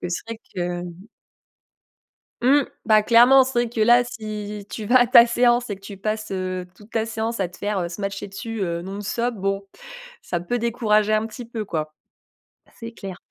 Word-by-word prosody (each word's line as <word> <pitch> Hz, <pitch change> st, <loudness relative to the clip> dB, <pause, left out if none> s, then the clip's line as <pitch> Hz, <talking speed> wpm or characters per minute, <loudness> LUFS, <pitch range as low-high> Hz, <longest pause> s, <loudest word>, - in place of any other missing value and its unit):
que 180 Hz, -, -4 dB
c'est 175 Hz, -, -3 dB
vrai 230 Hz, 0 st, -6 dB, 0.4 s
que -, -, -6 dB, 1.5 s
Mmh, 280 Hz, +3 st, +5 dB, 0.2 s
bah, 215 Hz, -1 st, +5 dB
clairement. 245 Hz, +4 st, +7 dB
C'est 260 Hz, -, -4 dB
vrai 240 Hz, -1 st, +1 dB
que, 230 Hz, -1 st, -4 dB
là, 240 Hz, +2 st, +6 dB
si 210 Hz, -3 st, -6 dB
tu 215 Hz, -, -5 dB
vas 245 Hz, +4 st, +4 dB
à 245 Hz, -, +5 dB
ta 240 Hz, -1 st, +8 dB
séance 240 Hz, 0 st, +2 dB
et 200 Hz, -, -4 dB
que -, -, -21 dB
tu 195 Hz, 0 st, -9 dB
passes, 215 Hz, +1 st, -3 dB
heu, 185 Hz, -1 st, -3 dB
toute 210 Hz, +4 st, -18 dB
la 225 Hz, -1 st, +1 dB
séance 225 Hz, +1 st, -3 dB
à 190 Hz, -3 st, 0 dB
te 180 Hz, -, -15 dB
faire, 205 Hz, -1 st, -2 dB
heu, 170 Hz, -, -2 dB
smasher 195 Hz, +2 st, -5 dB
dessus, 225 Hz, +3 st, -6 dB
heu, 170 Hz, -2 st, -2 dB
non 195 Hz, +3 st, -6 dB
stop, 235 Hz, +3 st, -1 dB
bon, 195 Hz, 0 st, -2 dB, 0.6 s
ça 175 Hz, -, -3 dB
peut 240 Hz, +7 st, -2 dB
décourager 215 Hz, -2 st, +2 dB
un 215 Hz, +1 st, +2 dB
petit 235 Hz, +2 st, -9 dB
peu, 230 Hz, -2 st, -5 dB
quoi. 155 Hz, -5 st, -4 dB, 0.9 s
C'est 230 Hz, -1 st, -7 dB
clair. 195 Hz, -4 st, -8 dB
215 Hz, 200 wpm, -23 LUFS, 195-235 Hz, 1.5 s, ta